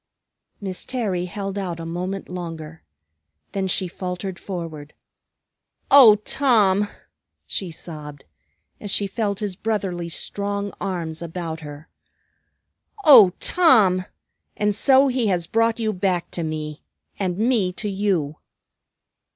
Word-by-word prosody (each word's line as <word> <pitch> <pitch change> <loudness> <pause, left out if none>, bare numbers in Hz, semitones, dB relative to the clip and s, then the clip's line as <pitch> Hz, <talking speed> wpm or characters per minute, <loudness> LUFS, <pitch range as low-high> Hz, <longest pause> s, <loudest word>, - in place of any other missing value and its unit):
Miss 190 -3 -5
Terry 205 -9 -2
held 195 +1 -5
out 175 -4 -4
a 165 - -6
moment 180 +4 -4
longer. 165 -3 -7 0.7
Then 195 -1 -2
she 185 0 0
faltered 180 +1 -5
forward. 165 -6 -7 1.0
"O 255 -7 +10
Tom!" 210 -3 +2 0.6
she 190 - -3
sobbed, 150 -3 -8 0.5
as 205 - -7
she 200 - +2
felt 200 0 -2
his 205 -3 -3
brotherly, 190 -5 -3
strong 200 +3 -3
arms 170 -5 -4
about 165 -1 -5
her. 150 +1 -10 1.2
"O 245 -11 +9
Tom! 215 - +4 0.5
And 210 0 +1
so 265 +6 +5
he 250 -3 0
has 180 -4 0
brought 230 +4 +1
you 220 -2 0
back 180 -2 -1
to 175 - -4
me, 155 -1 -5 0.4
and 185 -3 -1
me 220 -4 +1
to 210 - -4
you!" 190 -7 -1
190 Hz, 120 wpm, -22 LUFS, 170-210 Hz, 1.2 s, O